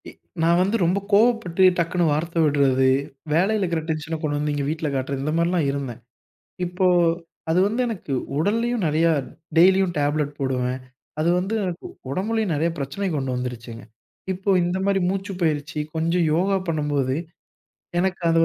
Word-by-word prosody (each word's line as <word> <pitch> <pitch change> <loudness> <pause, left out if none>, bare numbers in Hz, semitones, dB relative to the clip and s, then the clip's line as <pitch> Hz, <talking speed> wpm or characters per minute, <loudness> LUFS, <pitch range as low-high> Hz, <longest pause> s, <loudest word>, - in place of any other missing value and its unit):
இ - - -10 0.3
நான் 170 +2 +4
வந்து 195 +4 +1
ரொம்ப 180 +4 +2
கோவப்பட்டு 205 -4 +3
டக்குனு 170 +1 +1
வார்த்த 165 +3 0
விட்றது, 140 -3 +3 0.5
வேலையில 200 +6 +2
இருக்கற 170 -3 -1
டென்ஷன 160 +1 -2
கொண்டு 145 -2 -1
வந்து 150 0 -1
இங்க 145 -1 -1
வீட்ல 160 0 -2
காட்டுறது, 135 0 -2
இந்த 155 +2 -1
மாரிலாம் 170 -2 +1
இருந்தேன். 135 -5 -5 0.7
இப்போ, 180 +2 0 0.6
அது 170 +3 +3
வந்து 225 +5 -1
எனக்கு 210 -11 -5 0.3
உடல்லயும் 230 +6 0
நெறையா 160 +2 +3 0.5
டெய்லியும் 185 +1 +5
டேப்லெட் 145 0 0
போடுவேன். 130 -1 -1 0.4
அது 160 - +2
வந்து 190 +5 -2
எனக்கு 180 -1 -4 0.2
உடம்புலயும் 210 +4 -1
நெறைய 160 +3 +1
பிரச்சனைய 145 +8 -3
கொண்டு 135 -2 -2
வந்துருச்சுங்க. 120 -2 -6 0.5
இப்போ 190 +2 -2
இந்த 175 +2 -1
மாரி 200 -1 +2
மூச்சு 195 +1 -2
பயிற்சி, 155 -1 -1 0.2
கொஞ்சம் 165 +1 +1
யோகா 190 +4 +2
பண்ணும்போது, 145 -4 0 0.8
எனக்கு 190 0 -1
அது 165 - +3
165 Hz, 150 wpm, -23 LUFS, 145-190 Hz, 0.8 s, டெய்லியும்